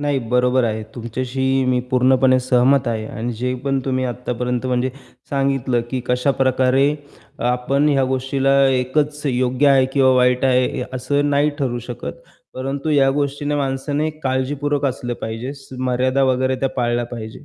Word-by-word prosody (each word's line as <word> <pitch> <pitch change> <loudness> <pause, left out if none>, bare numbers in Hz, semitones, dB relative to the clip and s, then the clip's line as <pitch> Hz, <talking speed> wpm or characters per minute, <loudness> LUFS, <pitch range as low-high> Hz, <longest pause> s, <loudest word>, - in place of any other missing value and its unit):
नाही, 145 -2 0
बरोबर 125 0 +2
आहे. 110 -1 -2
तुमच्याशी 130 +3 -1
मी 125 -1 +2
पूर्णपणे 130 0 +4
सहमत 130 +2 +3
आहे. 110 -2 -2
आणि 120 +2 -4
जे 125 0 -1
पण 135 -1 +1
तुम्ही 130 -1 -1
आत्तापर्यंत 125 0 -3
म्हणजे 125 0 0 0.4
सांगितलं, 135 -3 0
की 130 - -2
कशाप्रकारे 130 +1 +2 0.5
अ, - - -6
आपण 125 +4 +1
ह्या 135 -2 +2
गोष्टीला 135 +1 0
एकच 145 +4 0
योग्य 130 +1 +1
आहे 135 -1 +5
किंवा 135 -2 +4
वाईट 125 0 +3
आहे 130 -1 +3 0.2
ए - - -1
असं 145 +3 0
नाही 145 +1 +2
ठरू 125 -3 -1
शकत. 115 -13 -5 0.4
परंतु 135 +4 -3
या 135 -2 +4
गोष्टीने 145 +1 -1
माणसाने 145 +3 -1
काळजीपूर्वक 140 +2 -1
असलं 125 -2 -3
पाहिजे. 115 +4 -4
स 135 -1 -16 0.2
मर्यादा 130 +2 +1
वगैरे 130 0 +1
त्या 135 - +1
पाळल्या 120 -1 0
पाहिजे. 115 +2 -8
130 Hz, 155 wpm, -20 LUFS, 125-135 Hz, 0.5 s, आहे